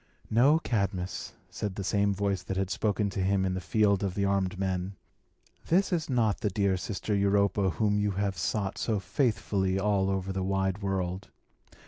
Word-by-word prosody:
"No, 130 +8 +5
Cadmus," 100 - -2 0.2
said 100 -3 -4
the 100 - -4
same 100 +2 +2
voice 100 -2 -1
that 95 +1 -4
had 95 -1 -1
spoken 105 -1 0
to - - -4
him 95 0 +2
in 95 - 0
the 95 - -3
field 100 +3 +2
of 95 -2 -2
the 100 - +1
armed 95 -2 0
men, 95 0 -2 0.7
"this 185 +3 +2
is 160 -4 -1
not 115 -5 +1
that 100 -3 -1
dear 100 -2 +2
sister 100 +3 -3
Europa 100 0 +2
whom 105 +4 +1
you 105 0 +1
have 100 0 -1
sought 95 +5 -2
so 110 -3 0
faithfully 100 - 0
all 100 -1 +1
over 95 0 -2
the 95 - -2
wide 95 +1 0
world. 95 -1 -2
100 Hz, 180 wpm, -29 LUFS, 95-105 Hz, 0.7 s, No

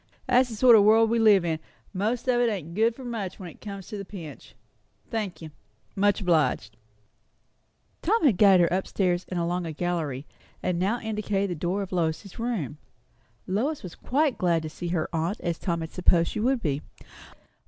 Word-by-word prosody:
"That's 255 0 +3
the 225 - -6
sort 240 +1 +7
o' 215 - +7
world 220 +2 +5
we 230 - +2
live 205 -5 +5
in; 160 -2 -1 0.3
most 220 +7 -1
of 245 -1 +3
it 240 - +3
ain't 170 -6 -5
good 225 +4 +2
for 260 - -10
much 215 -6 -4
when 180 -3 -7
it - - -20
comes 200 -3 -7
to 210 -3 -5
the - - -5
pinch. 170 -7 -10 0.6
Thank 210 -7 -3
you 155 - -8 0.4
much 205 +1 +2
obliged." 150 - +1 1.3
Tom 450 -5 +1
had 235 -10 +4
guided 195 -3 +7
her 170 - +2
up 190 +1 -1
stairs 180 -2 0
and 180 - -2
along 175 +1 -1
a - - -4
gallery, 155 -5 -3 0.4
and 180 -1 0
now 205 +7 0
indicated 210 -3 -2
the 170 - -5
door 185 +4 -1
of 195 - -9
Lois's 175 +3 -2
room. 205 - -3 0.7
Lois 255 +11 -1
was 180 - -7
quite 285 +1 0
as - - -20
glad 170 -3 +2
to 155 - -4
see 175 - -6
her 170 -2 -1
aunt 165 +5 -1
as 170 -1 -2
Tom 170 -2 -2
had 160 - -6
supposed 175 -2 +2
she - - -4
would 250 +2 +1
be. 145 -3 -1
190 Hz, 200 wpm, -26 LUFS, 170-220 Hz, 1.3 s, sort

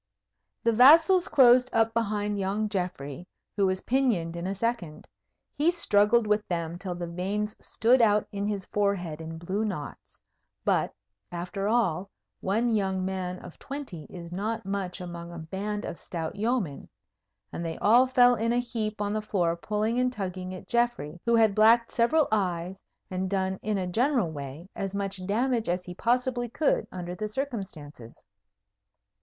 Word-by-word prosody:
The 230 - +4
vassals 325 - +7
closed 250 -1 +6
up 225 0 +2
behind 210 -2 -1
young 200 +3 0
Geoffrey, 180 -5 -4 0.3
who 200 -2 +3
was 185 0 -1
pinioned 230 -11 +1
in 170 +1 -4
a 195 - -2
second. 195 -8 -3 0.5
He 300 +3 +2
struggled 235 -9 +3
with 210 0 +1
them 170 -1 -3
till 180 -2 -4
the 175 0 -4
veins 195 +5 -3
stood 240 +3 +3
out 210 -2 +4
in 200 0 -2
his 200 -3 -2
forehead 185 -6 -1
in 160 0 -7
blue 185 +6 -2
knots; 185 -9 -6 0.5
but, - - +2 0.4
after 180 +3 -3
all, 195 -5 +1 0.3
one 225 +5 +1
young 190 -3 0
man 185 -1 -3
of - - -12
twenty 270 - -7
is 170 -1 -9
not 215 +4 -3
much 195 -1 -3
among 170 -1 -7
a 170 - -8
band 195 +6 -4
of - - -6
stout 165 0 -5
yeomen; 210 - -2 0.6
and 170 - -4
they 165 -1 -4
all 240 +5 +5
fell 245 -1 +5
in 230 0 0
a 240 - +2
heap 220 -3 -2
on 205 0 -1
the 215 - -1
floor, 175 -5 0
pulling 215 +6 -1
and 250 0 +2
tugging 185 -5 -5
at 185 - -11
Geoffrey, 235 -10 0
who 235 - +4
had 220 -3 +4
blacked 230 +3 +5
several 285 +6 +3
eyes, 185 -3 -1 0.3
and 185 0 -2
done 190 -1 -1
in 215 -1 -1
a 185 - -1
general 230 - +1
way 145 +3 -7
as 195 0 -4
much 195 -1 -3
damage 235 +1 0
as 180 +1 -1
he 180 - -7
possibly 245 +3 0
could 290 +6 +1
under 180 -1 -5
the 215 +4 -3
circumstances. 195 - -6
200 Hz, 165 wpm, -27 LUFS, 180-230 Hz, 0.6 s, vassals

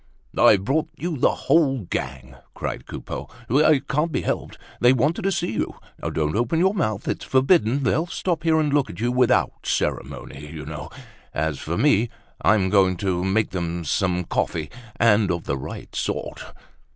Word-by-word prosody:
"I've 100 -3 +5
brought 155 +7 +1
you 170 0 -3
the 130 - +3
whole 140 -4 +2
gang!" 65 -4 -5 0.2
cried - - -5
Coupeau. - - -6 0.2
"It 145 +2 +3
can't 150 +4 0
be - - 0
helped! - - -3 0.2
They 120 +2 +6
wanted 145 +6 +1
to 195 - +1
see 175 -1 -1
you. 110 - -2 0.3
Don't 75 -1 -1
open 120 +8 +1
your 190 +4 +3
mouth, 110 - -1
it's - - -2
forbidden. 135 - +3
They'll 160 +6 +1
stop 175 -2 -2
here 160 -1 +3
and 150 -2 +1
look 145 -2 +2
at - - -9
you 120 +2 +1
without 125 -1 +3 0.2
ceremony, 70 +1 -3
you 75 -3 -7
know. 75 0 -7 0.5
As 80 -2 -1
for 85 +2 -3
me, 120 -6 +3 0.3
I'm 95 -4 +3
going 95 -3 +4
to 90 -1 -1
make 100 +2 +1
them 85 -2 -3
some 90 +3 +1
coffee, 80 -2 -2 0.2
and 105 -3 +4
of 85 -1 -1
the - - -1
right 65 - -8
sort!" - - -3
110 Hz, 175 wpm, -23 LUFS, -, 0.5 s, They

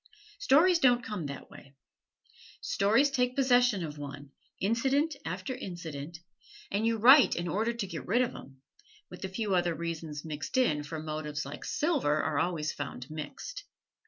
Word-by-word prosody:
Stories 355 - +5
don't 245 -3 +4
come 205 -10 -4
that 140 - -8
way. 140 0 -14 0.8
Stories 230 +8 +2
take 250 -2 +1
possession 245 -8 +3
of 150 -1 -8
one 140 -1 -8 0.3
incident 270 +9 +1
after 185 +8 -4
incident 165 - -7 0.5
and 210 +3 +1
you 230 0 +1
write 260 +5 +7
in 175 +1 -3
order 215 +7 0
to 235 -3 -3
get 170 -4 -7
rid 240 +7 +3
of 250 - -4
'em 135 0 -13 0.5
with - - -9
a 190 - -3
few 205 +1 -2
other 175 -2 +2
reasons 165 -2 -5
mixed 150 - -4
in, 195 -13 +3
for 155 +2 -6
motives, 155 -1 -4
like 140 - -8
silver, 280 - +1
are 150 -1 0
always 155 -2 0
found 140 -1 -6
mixed. 280 - -7
185 Hz, 160 wpm, -30 LUFS, 150-245 Hz, 0.8 s, write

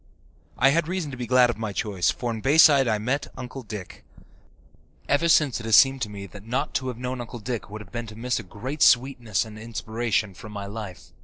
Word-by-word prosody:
I 135 - +5
had 160 +2 +1
reason 175 -5 -3
to - - -6
be 120 -2 -5
glad 125 0 +5
of 110 - -10
my 110 -2 -3
choice, 95 -4 0
for 120 -1 -2
in 110 -1 -5
Bayside 140 -1 +6
I 110 -2 +2
met 125 +7 -2
Uncle 130 +1 -7
Dick. 105 -5 -9 1.0
Ever 165 +4 +2
since 150 -6 +4
it 115 - -8
has 110 - +5
seemed 135 -1 +6
to 105 - -2
me 100 -1 -7
that 100 +1 -12
not 125 +6 -2
to 130 - -1
have 125 -3 -4
known 125 0 -4
Uncle 120 +1 -7
Dick 115 -1 -5
would 105 +1 -7
have 95 - -14
been 120 -1 -5
to 110 - -10
miss 125 +2 -1
a - - -4
great 130 - -7
sweetness 120 -5 +3
and 110 -1 -10
inspiration 115 -2 -2
from 105 +3 -11
my 100 -1 -5
life. 100 -5 -8
120 Hz, 230 wpm, -25 LUFS, 105-130 Hz, 1.0 s, Bayside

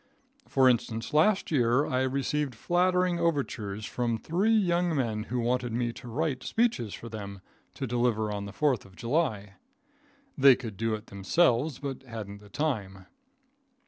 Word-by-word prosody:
For 130 -1 +4
instance, 115 -1 0
last 190 +7 +3
year 125 0 +3
I 130 0 0
received 135 +1 -1
flattering 180 +5 +1
overtures 120 -11 -1
from 120 -2 -1
three 175 - 0
young 175 -4 +1
men 110 -5 -1
who 125 +2 -2
wanted 120 0 0
me 120 0 -1
to 120 - -11
write 130 +2 -1
speeches 220 - 0
for 115 - -9
them 100 -3 -7 0.4
to 135 - -3
deliver 120 -3 0
on 100 -1 -4
the 100 - -7
Fourth 130 -1 +1
of 95 -1 -17
July. 115 - -1 0.8
They 135 -2 +7
could 115 -4 -7
do 115 +1 -1
it 105 +1 -9
themselves, 125 - +1
but 135 -3 -5
hadn't 110 -5 -8
the 105 0 -16
time. 100 -8 -3
125 Hz, 155 wpm, -28 LUFS, 110-150 Hz, 0.8 s, They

